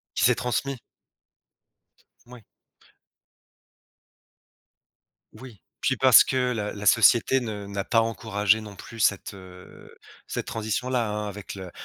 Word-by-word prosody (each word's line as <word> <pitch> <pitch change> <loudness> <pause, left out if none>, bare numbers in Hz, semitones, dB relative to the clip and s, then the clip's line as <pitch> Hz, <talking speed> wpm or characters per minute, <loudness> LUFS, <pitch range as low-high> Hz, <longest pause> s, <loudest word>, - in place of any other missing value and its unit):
Qui - - +2
s'est 125 0 +4
transmis. 125 +3 -2 1.5
Moui. 120 -2 -14 2.9
Oui, 125 -6 -13 0.2
puis 130 - +1
parce 130 0 +7
que 130 - -2
la 105 -3 -3
la 105 -1 -8
société 120 +5 +4
ne 105 -4 -6
n'a 100 0 -4
pas 115 +2 +2
encouragé 110 -2 0
non 105 -2 -10
plus 115 +3 -12
cette, 100 -3 +1
heu, 90 -1 -14 0.3
cette - - -4
transition-là, 115 +2 -2
hein, 105 0 -3
avec 100 0 -8
le 95 -2 -9
110 Hz, 120 wpm, -25 LUFS, 100-120 Hz, 2.9 s, parce